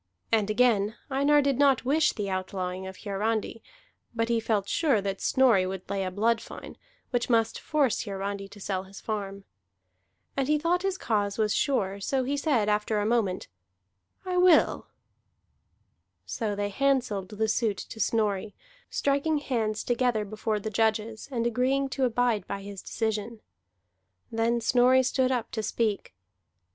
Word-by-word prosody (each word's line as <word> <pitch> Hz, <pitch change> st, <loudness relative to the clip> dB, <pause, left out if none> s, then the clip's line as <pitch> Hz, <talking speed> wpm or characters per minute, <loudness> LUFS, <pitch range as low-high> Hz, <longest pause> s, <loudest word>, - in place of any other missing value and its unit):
And 215 Hz, -2 st, +2 dB
again, 215 Hz, -2 st, +2 dB, 0.2 s
Einar 285 Hz, +2 st, +4 dB
did 275 Hz, -2 st, +1 dB
not 275 Hz, -3 st, +4 dB
wish 300 Hz, +4 st, +3 dB
the 205 Hz, -3 st, -4 dB
outlawing 185 Hz, -1 st, -3 dB
of 190 Hz, 0 st, -10 dB
Hiarandi; 220 Hz, +2 st, -2 dB, 0.5 s
but 230 Hz, 0 st, 0 dB
he 235 Hz, -1 st, +2 dB
felt 215 Hz, -3 st, 0 dB
sure 285 Hz, -6 st, +2 dB
that 195 Hz, -1 st, -3 dB
Snorri 235 Hz, -8 st, +4 dB
would 190 Hz, -1 st, -6 dB
lay 195 Hz, 0 st, -2 dB
a 185 Hz, -, -2 dB
blood 225 Hz, +4 st, +1 dB
fine, -, -, -10 dB, 0.4 s
which 245 Hz, 0 st, 0 dB
must 225 Hz, -2 st, +2 dB
force 290 Hz, -6 st, +1 dB
Hiarandi 195 Hz, -1 st, -4 dB
to 205 Hz, -, -13 dB
sell 190 Hz, -1 st, -3 dB
his 195 Hz, +1 st, -11 dB
farm. 200 Hz, -2 st, -4 dB, 0.9 s
And 270 Hz, -1 st, 0 dB
he 300 Hz, +1 st, +3 dB
thought 340 Hz, +4 st, +1 dB
his 385 Hz, -1 st, -1 dB
cause 205 Hz, -, -1 dB
was 215 Hz, -2 st, +1 dB
sure, 200 Hz, -9 st, 0 dB
so 260 Hz, +6 st, 0 dB
he 275 Hz, +3 st, -1 dB
said 280 Hz, -7 st, +1 dB
after 210 Hz, +1 st, +1 dB
a 205 Hz, -, 0 dB
moment: 215 Hz, -5 st, 0 dB, 0.8 s
"I 365 Hz, -1 st, -1 dB
will." 360 Hz, -3 st, +4 dB, 1.4 s
So 215 Hz, -4 st, -2 dB
they 205 Hz, 0 st, -2 dB
handselled 250 Hz, -7 st, 0 dB
the 220 Hz, +1 st, -1 dB
suit 220 Hz, -2 st, 0 dB
to 225 Hz, -, -8 dB
Snorri, 210 Hz, -2 st, 0 dB, 0.3 s
striking 285 Hz, +3 st, +1 dB
hands 225 Hz, -7 st, -1 dB
together 240 Hz, -3 st, +1 dB
before 215 Hz, +1 st, -2 dB
the 215 Hz, +2 st, -5 dB
judges, 220 Hz, +1 st, 0 dB
and 235 Hz, -3 st, -1 dB
agreeing 260 Hz, +3 st, +1 dB
to 265 Hz, 0 st, 0 dB
abide 235 Hz, -4 st, +1 dB
by 200 Hz, 0 st, -5 dB
his 200 Hz, -1 st, -8 dB
decision. 220 Hz, 0 st, -3 dB, 0.9 s
Then 230 Hz, +1 st, +1 dB
Snorri 250 Hz, +2 st, +4 dB
stood 255 Hz, 0 st, +1 dB
up 240 Hz, -3 st, -2 dB
to 220 Hz, -, -2 dB
speak. 215 Hz, -, -2 dB
225 Hz, 155 wpm, -27 LUFS, 205-255 Hz, 1.4 s, Einar